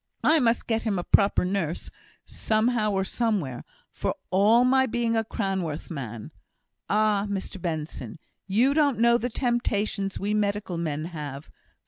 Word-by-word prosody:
I 315 +1 +6
must 235 -3 +2
get 225 -1 0
him 210 -4 -1
a 175 - -2
proper 200 -1 +3
nurse, 180 -4 -2 0.3
somehow 220 0 +1
or 195 -2 0
somewhere, 190 - -1 0.3
for - - -2 0.2
all 210 +6 +5
my 265 +1 +4
being 235 -1 0
a 225 - +2
Cranworth 190 -9 -3
man. 120 -8 -6 0.6
Ah, 210 -1 +2
Mr 195 -1 -4
Benson! 155 -8 -4 0.3
you 235 +8 +3
don't 290 -4 +2
know 235 +1 +4
the 245 - -2
temptations 215 -5 -1
we 205 +1 -1
medical 205 -4 -1
men 155 -2 -2
have. 150 -4 -7
205 Hz, 145 wpm, -26 LUFS, 175-230 Hz, 0.6 s, I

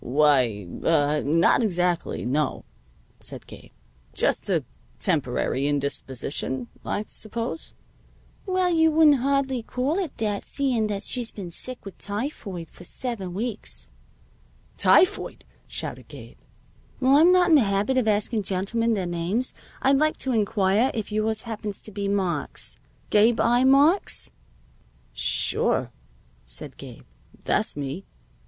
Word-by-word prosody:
"Why 125 -8 +2 0.2
ah 150 -2 +2
not 165 - +3
exactly; 180 -5 0
no," 145 +5 -1 0.5
said - - -7
Gabe. - - -13 0.5
"Just - - 0
a - - +1 0.3
temporary 135 +2 0
indisposition, 135 -2 -2
I 205 - -2
suppose?" 230 +8 -6 0.7
"Well, 370 -1 +1
you 320 -1 +4
wouldn't 310 -2 +5
hardly 270 -1 0
call 260 - -1
it 355 -7 -4
that, 210 -2 -1
seeing 250 -6 0
that 205 -1 -3
she's 240 0 -1
been 185 -4 -7
sick 255 +8 -1
with 195 - -10
typhoid 205 - -5
for - - -14
seven 195 -3 -4
weeks." 220 +1 -5 0.8
"Typhoid!" 370 - +3 0.2
shouted - - -6
Gabe. - - -12 0.6
"While 265 +2 +4
I'm 335 +4 +7
not 360 -1 +4
in 320 - +7
the 290 - +6
habit 200 +4 +1
of 250 -4 +2
asking 215 +1 +1
gentlemen 215 +5 0
their 190 -3 -2
names, 175 +8 -1 0.3
I'd 270 +1 +4
like 310 +1 +2
to 265 - 0
inquire 215 +1 +2
if 220 -2 -4
yours 215 +1 0
happens 215 -3 -5
to 215 - -9
be 200 0 -3
Marks 185 -7 -2 0.3
Gabe 220 +2 +4
I. 240 +2 +3
Marks?" 285 - +3 0.8
"Sure," - - +1 0.5
said - - -7
Gabe. - - -11 0.4
"That's - - 0
me." 145 +7 -5
215 Hz, 130 wpm, -25 LUFS, 175-255 Hz, 0.8 s, I'm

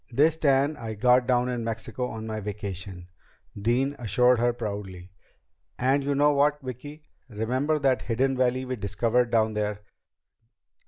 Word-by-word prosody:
"This 150 +6 +3
tan 145 0 +2
I 115 -4 -6
got 125 +3 +3
down 125 -1 +2
in 120 -2 -2
Mexico 115 +2 -4
on 110 -2 -7
my 110 -1 -4
vacation," 100 -3 -6 0.5
Dean 125 +7 0
assured 125 +2 +3
her 120 +1 +3
proudly. 100 -5 -6 0.7
"And 135 +3 +2
you 140 0 0
know 145 +1 +4
what, 145 +1 +2
Vicki? 145 +4 -8 0.3
Remember 130 +8 -1
that 135 -3 +1
hidden 130 +3 0
valley 130 0 +1
we 130 0 -4
discovered 115 +4 0
down 110 -1 +2
there? 105 -1 -2
125 Hz, 150 wpm, -26 LUFS, 110-135 Hz, 0.7 s, know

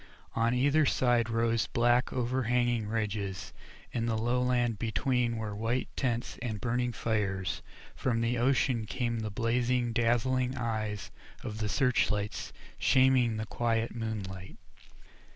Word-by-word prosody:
On 115 +2 +2
either 145 +5 +3
side 120 -4 +2
rose 115 0 +1
black 120 +1 +2
overhanging 120 -2 0
ridges, 105 -3 -3 0.4
in 115 -1 -1
the 110 -1 0
lowland 120 -1 +1
between 120 +1 0
were 110 -2 -4
white 115 +4 -1
tents 120 -3 -2
and 110 -4 -3
burning 125 +1 0
fires, 105 -4 -1 0.3
and - - -21
from 115 -3 +1
the 115 +1 +1
ocean 120 -2 +1
came 120 -1 -1
the 110 -1 -3
blazing, 120 +2 0
dazzling 125 +2 +1
eyes 110 -3 -3 0.3
of 105 0 -5
the 105 -1 -1
search 125 +1 +2
lights 105 -1 -2 0.3
shaming 130 -3 +4
the 110 - -3
quiet 115 0 -1
moonlight. 100 -5 -5
115 Hz, 135 wpm, -30 LUFS, 110-125 Hz, 0.4 s, shaming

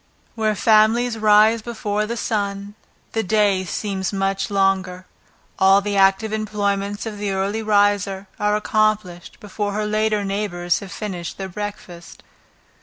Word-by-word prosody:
Where 220 -2 0
families 225 +3 +3
rise 215 +1 +5
before 215 -2 -3
the 235 +1 -4
sun, 200 -2 -3 0.4
the 225 - 0
day 205 -2 +2
seems 190 +1 -3
much 195 -1 -1
longer; 190 -2 0 0.5
all 195 +1 +6
the 200 0 -3
active 195 +3 +3
employments 205 -1 -2
of 215 -2 -6
the 205 -1 -2
early 200 +3 -1
riser 205 -2 +1
are 210 0 +1
accomplished 215 -5 -1
before 205 0 -4
her 210 +1 -1
later 215 -1 0
neighbors 195 -3 -1
have 195 -3 -10
finished 190 -5 -6
their 195 -1 -5
breakfast. 190 -3 -8
205 Hz, 135 wpm, -21 LUFS, 195-215 Hz, 0.5 s, all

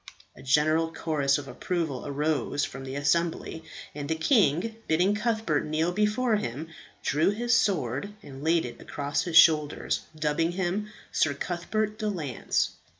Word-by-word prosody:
A - - -13
general 155 +4 +2
chorus 145 -4 +1
of 145 -1 -7
approval 150 +1 -3
arose 145 0 0
from 135 +1 -8
the 135 0 -6
assembly, 160 +3 0 0.3
and 145 0 -6
the 160 - +1
king, 200 - +2
bidding 180 +6 +3
Cuthbert 215 -8 0
kneel 155 +3 0
before 215 +4 +1
him, 150 - -5 0.3
drew 155 +5 +2
his 235 +4 0
sword 160 - 0
and 135 0 -10
laid 165 +1 +2
it 120 -1 -8
across 145 0 -2
his 170 -2 +2
shoulders, 150 -3 +4 0.2
dubbing 155 +3 +1
him 190 +3 -2 0.2
Sir 145 -2 +1
Cuthbert 210 +7 -2
de 215 - -1
Lance. 155 - -1
160 Hz, 150 wpm, -27 LUFS, 145-195 Hz, 0.3 s, shoulders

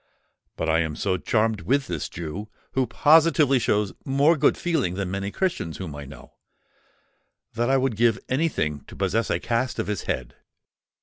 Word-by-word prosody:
But 80 - -3
I 80 0 +3
am 80 -2 -1
so 95 +2 0
charmed 110 +1 0
with 140 +2 +1
this 85 -5 -4
Jew, 90 +6 -6 0.2
who 130 -1 0
positively 150 +1 +4
shows 105 -3 0
more 140 +4 +3
good 145 - +3
feeling 155 - 0
than 95 -2 -3
many 100 0 -2
Christians 170 - -2
whom 85 -6 -6
I 75 -1 -7
know, 70 +3 -13 1.2
that 120 +2 0
I 135 - +4
would 130 -3 0
give 115 -2 +3
any 155 +6 +1
thing 75 - -2
to - - -12
possess 115 +1 0
a - - +1
cast 120 +1 -1
of - - -1
his 105 -2 -3
head. 65 -2 -3
110 Hz, 180 wpm, -24 LUFS, 90-135 Hz, 1.2 s, positively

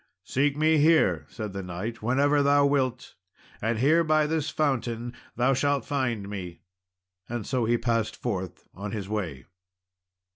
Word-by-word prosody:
"Seek 140 +5 0
me 155 0 +4
here," 160 +2 +3
said 105 -4 -6
the 100 - -4
knight, 95 +6 -5
"whenever 140 +5 +3
thou 140 0 +4
wilt, 130 -3 0 0.5
and 115 +1 0
here 155 +8 +4
by 155 -1 +3
this 155 -1 -1
fountain 120 -5 -1 0.2
thou 125 +3 +3
shalt 140 +1 +1
find 125 -8 -1
me;" 90 -4 -7 0.7
and 120 -3 -4
so 125 -3 0
he 120 +1 +2
passed 115 -2 0
forth 95 -7 -4
on 100 +2 -6
his 100 -3 -4
way. 90 - -4
120 Hz, 150 wpm, -27 LUFS, 105-145 Hz, 0.7 s, me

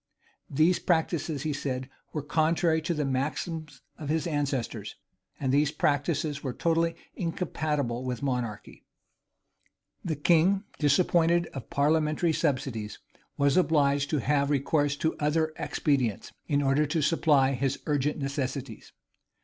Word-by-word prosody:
These 160 +6 +3
practices, 160 -3 0
he 155 -1 -1
said, 130 -2 -3 0.2
were 150 - -3
contrary 160 +2 +2
to 170 +2 -1
the 150 -1 -1
maxims 150 +3 -3 0.2
of 150 - -6
their 160 +1 0
ancestors; 140 -4 -2 0.4
and 130 -1 0
these 145 +1 +3
practices 145 0 0
were 130 -3 -3
totally 165 +2 +1 0.2
incompatible 150 -8 -2
with 125 0 -4
monarchy.[*] 125 -6 -3 1.2
The 160 - -1
king, 175 +6 +3 0.2
disappointed 170 +3 +3
of 135 - -7
parliamentary 155 +3 +2
subsidies, 130 -9 -1 0.4
was 140 -1 +3
obliged 145 -5 +3
to 155 - +1
have 140 +2 +1
recourse 145 0 +1
to 160 +2 -1
other 155 +1 +1
expedients, 130 -9 -1 0.2
in 145 -2 +1
order 140 +2 +2
to 155 +1 0
supply 145 -4 +3
his 135 0 -1
urgent 145 0 0
necessities. 135 -4 -4
145 Hz, 125 wpm, -28 LUFS, 135-160 Hz, 1.2 s, These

